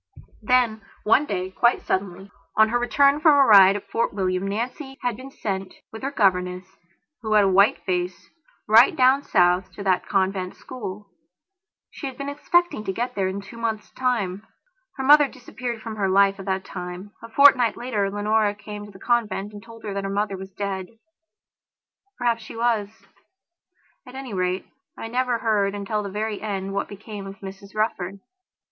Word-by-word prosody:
Then 230 -1 +2 0.2
one 265 +7 +3
day, 185 -1 -3
quite 235 +5 +2
suddenly, 190 0 -3 0.2
on 220 0 +5
her 240 +2 +1
return 280 +4 +3
from 310 0 +6
a 275 - +6
ride 195 -3 +8
at 205 - -6
Fort 230 - 0
William, 185 -1 -1
Nancy 255 +6 -4
had 245 -2 0
been 260 +4 -10
sent, 195 -7 -5 0.2
with 220 - -9
her 270 - -2
governess, 185 -7 +1 0.6
who 220 -2 -2
had 210 -1 +6
a - - +3
white 195 +3 +3
face, 180 -1 -2 0.4
right 225 +4 +6
down 260 +1 +4
South 180 -6 +2
to 200 - -7
that 185 -2 +1
convent 190 -1 0
school. 205 -5 -8 0.8
She 280 - -6
had 265 - -8
been 280 0 -4
expecting 320 -3 +1
to - - -1
go 240 +6 -2
there 195 -4 0
in 190 +2 -4
two 200 +4 -12
months' 225 -2 -3
time. 205 -7 -1 0.6
Her 265 - -3
mother 290 +1 +7
disappeared 245 -3 -7
from 225 -2 -6
her 195 -2 0
life 195 +1 +4
at 195 - -8
that 190 0 -1
time. 180 +2 -7
A 230 - -10
fortnight 255 -2 +5
later 215 -5 -1
Leonora 205 +1 +1
came 210 0 -8
to 205 - -13
the 190 - -14
convent 215 -2 -1
and 205 - -9
told 230 +1 -14
her 205 - -4
that 200 0 -3
her 195 - -3
mother 200 0 -1
was 190 0 -8
dead. 195 -1 -4 1.3
Perhaps 235 -2 0
she 220 - -10
was. 230 -3 +1 1.2
At 250 - -11
any 265 -4 -7
rate, 185 0 -1 0.3
I - - -6
never 250 0 0
heard 205 -3 +1
until 205 +1 -2
the 200 - -5
very 210 +1 -3
end 195 -2 -3
what 200 - -2
became 205 -1 -8
of 195 - -8
Mrs 195 +1 -10
Rufford. 200 -3 -2
210 Hz, 180 wpm, -24 LUFS, 195-240 Hz, 1.3 s, ride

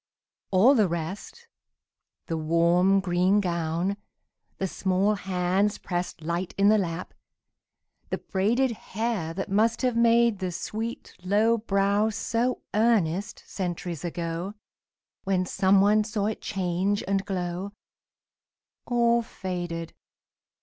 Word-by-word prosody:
All 205 +8 +6
the 215 -7 +4
rest 175 - -6 0.8
The 165 - -3
warm 170 +4 +3
green 185 +2 +2
gown, 170 +1 -1 0.6
the 190 - -1
small 190 +3 +1
hands 190 +1 0
pressed 175 -2 -4
Light 170 +3 -3
in 200 +1 +5
the 215 0 +5
lap, 175 -1 -4 1.0
the - - -1
braided 235 +7 +1
hair 215 -5 -3
That 195 - -3
must 225 +5 +2
have 250 -2 +1
made 235 -2 +4
the 185 -2 -2
sweet 220 +6 -5
low 215 +5 +3
brow 200 0 +1
So 230 +3 -1
earnest, 205 -4 +1
centuries 175 -3 -4
ago, 170 +3 -4 0.7
When 190 -1 +1
some 190 +1 +3
one 210 +2 +4
saw 210 -1 -2
it 215 - -2
change 190 +1 -1
and 195 0 +1
glow 185 0 -4 1.1
All 235 -1 +3
faded! 175 -6 -5
195 Hz, 115 wpm, -26 LUFS, 175-215 Hz, 1.1 s, All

